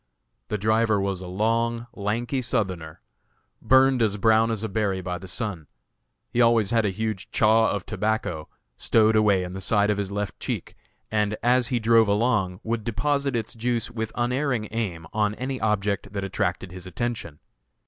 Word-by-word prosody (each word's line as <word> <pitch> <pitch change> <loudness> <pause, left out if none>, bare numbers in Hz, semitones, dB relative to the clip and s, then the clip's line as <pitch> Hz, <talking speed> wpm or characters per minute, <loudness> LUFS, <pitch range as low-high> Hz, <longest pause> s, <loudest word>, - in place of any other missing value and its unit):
The 105 - -2
driver 110 +1 +2
was 95 -1 -2
a 90 - -7
long, 115 +4 0
lank 110 +5 -3
Southerner, 95 - -2 0.6
burned 130 -1 +4
as 105 -2 +2
brown 110 +2 +4
as 110 -1 -2
a - - -1
berry 100 -2 -1
by 90 -1 -4
the 95 - -10
sun. 90 -2 -4 0.6
He 120 - +2
always 115 -3 +4
had 115 -2 +3
a - - +2
huge 105 -1 -3
"chaw" 110 +1 +4
of 100 -2 -3
tobacco 105 -8 -2 0.3
stowed 110 -1 +3
away 105 -3 +4
in 90 0 -6
the 95 - -6
side 105 +1 +2
of 105 - -1
his 100 -1 -3
left 105 0 -4
cheek, - - -4 0.4
and, 105 -1 0
as 125 0 +3
he 125 - 0
drove 115 0 +4
along, 100 -4 +1
would 115 -1 -2
deposit 140 +4 0
its 115 -1 -3
juice 120 0 -1
with 110 -2 -4
unerring 125 -2 0
aim 95 -8 -3
on 105 -1 +1
any 130 +1 -4
object 100 -2 -1
that 100 -1 -3
attracted 95 -1 -2
his 90 0 -9
attention. 110 -5 -4
110 Hz, 175 wpm, -25 LUFS, 100-115 Hz, 0.6 s, burned